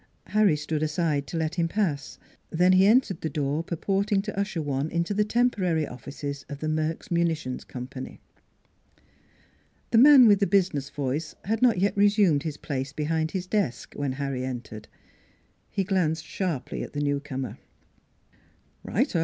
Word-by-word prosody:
Harry 210 -6 +3
stood 150 +1 -3
aside 155 -2 0
to 170 - -4
let 160 0 -1
him 170 -1 0
pass; 165 -7 -2 0.3
then 180 +3 +3
he 190 +1 +6
entered 220 -5 +3
the 160 - -2
door 150 +1 -1
purporting 195 +4 0
to 210 +2 -4
usher 200 -3 -2
one 145 0 -2
into 170 +4 -1
the 210 +1 +2
temporary 210 -8 +1
offices 140 +3 -7
of 145 - -5
the 155 - -3
Merks 155 +2 -2
Munitions 165 -6 -1
Company. 130 +1 -8 1.7
The 225 - +5
man 275 -1 +9
with 205 -2 +5
the 200 - +2
business 175 -9 +1
voice 145 +2 -3
had 220 +2 -1
not 245 -6 +4
yet 200 +3 +1
resumed 200 -7 +4
his 150 -1 -4
place 135 -2 -4
behind 155 +2 -1
his 185 +1 -3
desk 190 - -2
when 140 -2 -2
Harry 135 -1 -3
entered. 120 -4 -6 0.8
He 195 - -1
glanced 170 -5 0
sharply 175 -9 -3
at - - -7
the 145 - -3
newcomer. 140 -2 -3 0.6
" - - -36
Right 250 +2 0
o - - +3
160 Hz, 160 wpm, -26 LUFS, 145-195 Hz, 1.7 s, man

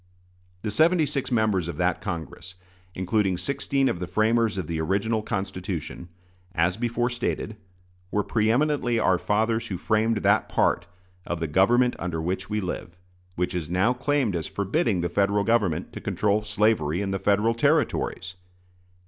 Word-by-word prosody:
The 105 - -2
seventy 160 - +4
six 140 -2 -3
members 110 -7 +1
of 85 - -5
that 90 +1 0
Congress, 85 0 -6 0.4
including 95 0 +1
sixteen 135 +6 0
of 90 - -1
the 90 - -4
framers 110 0 +2
of 95 - -2
the 80 0 -3
original 100 +6 0
Constitution, 95 -4 -4 0.5
as 85 +2 +2
before 120 +2 -1
stated, 120 -2 -3 0.5
were 105 +2 0
pre 105 +2 +1
eminently 130 -1 +2
our 95 -5 +3
fathers 110 +2 0
who 95 - -4
framed 110 +3 +1
that - - +3
part - - +1 0.4
of 85 - -2
"the 80 - -1
government 120 +10 +3
under 85 -2 -3
which 95 +4 -3
we 105 0 -1
live" 90 -2 -5 0.4
which 90 +1 -1
is 85 -4 -3
now 95 +7 +2
claimed 135 -5 0
as 80 -2 -2
forbidding 100 - 0
the 85 - 0
Federal 100 +2 +1
Government 105 -7 0
to - - -7
control 105 0 +1
slavery 105 -6 +1
in 100 -1 -2
the 95 - -1
Federal 105 +4 +2
Territories. 140 - 0
105 Hz, 160 wpm, -25 LUFS, 90-115 Hz, 0.5 s, seventy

